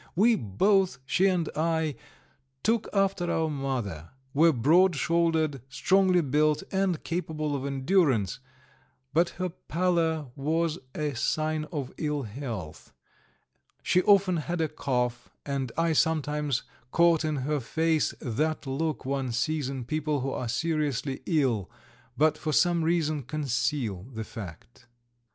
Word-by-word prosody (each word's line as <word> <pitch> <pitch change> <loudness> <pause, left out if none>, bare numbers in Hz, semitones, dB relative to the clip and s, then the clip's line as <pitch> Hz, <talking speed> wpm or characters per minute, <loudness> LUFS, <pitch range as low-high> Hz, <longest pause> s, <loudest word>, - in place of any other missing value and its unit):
We 220 +7 +5
both, 190 - +2
she 190 +8 +3
and 180 -4 +1
I, 160 -1 0 0.7
took 225 0 +1
after 195 -3 +1
our 160 -1 0
mother, 125 - -3 0.2
were 165 +3 +5
broad 165 +8 +4
shouldered, 160 -3 +1
strongly 185 +5 +3
built, 150 +1 +2
and 190 -4 0
capable 155 -4 -2
of 140 0 -3
endurance, 135 - +1 0.7
but 170 +3 +3
her 185 0 -1
pallor 165 -4 0
was 160 +3 0 0.2
a 150 -1 -1
sign 155 +4 -1
of 145 -5 -5
ill 150 -2 -1
health; 105 - -7 0.9
she 180 - +3
often 195 -3 +4
had 170 +3 -3
a 160 - +2
cough, 125 -4 -2 0.2
and 135 -3 -2
I 165 -1 +2
sometimes 150 -3 +1 0.3
caught 170 +2 +4
in 155 -1 0
her 145 +2 -1
face 160 +4 0
that 155 +7 -1
look 150 +3 -2
one 135 -2 -1
sees 150 +2 -1
in 130 -3 -5
people 150 0 -1
who 135 +1 -2
are 125 -3 -3
seriously 145 -1 -1
ill, 130 - +1 0.5
but 155 +1 +3
for 155 -1 -2
some 175 +1 +3
reason 160 -3 +1
conceal 125 -6 -2
the 110 -2 -5
fact. 110 +3 -10
155 Hz, 135 wpm, -28 LUFS, 135-165 Hz, 0.9 s, We